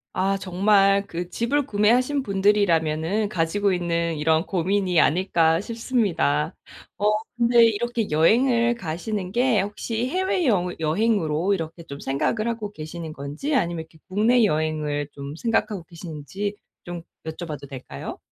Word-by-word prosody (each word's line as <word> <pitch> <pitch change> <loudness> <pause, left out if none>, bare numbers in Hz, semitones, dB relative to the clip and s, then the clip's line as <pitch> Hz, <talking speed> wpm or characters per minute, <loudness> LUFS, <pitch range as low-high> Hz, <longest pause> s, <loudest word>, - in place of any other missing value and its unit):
아 195 +2 +1
정말 195 +1 +3
그 175 0 -5
집을 275 +7 0
구매하신 250 +5 +2
분들이라면은 195 -2 +1
가지고 195 +3 +1
있는 170 -2 -1
이런 160 +2 +2
고민이 185 -1 +1
아닐까 165 -1 +3
싶습니다. 205 - 0 0.4
어 210 +1 +2 0.3
근데 235 0 +5
이렇게 230 0 0
여행을 235 - +3
가시는 185 0 -4
게 240 -2 +2
혹시 225 +4 -3
해외여 280 - +1
여행으로 175 0 +1
이렇게 165 -2 -4
좀 140 -3 -9
생각을 215 +12 -1
하고 215 -3 -4
계시는 160 0 -7
건지 150 - -3
아니면 170 -8 0
이렇게 160 0 -22
국내 225 +5 +3
여행을 155 -4 0
좀 140 0 -7
생각하고 215 -3 0
계시는지 170 +5 -6 0.3
좀 175 -1 -7 0.2
여쭤봐도 155 -3 -6
될까요? 130 -2 -7
190 Hz, 320 characters per minute, -24 LUFS, 160-220 Hz, 0.4 s, 근데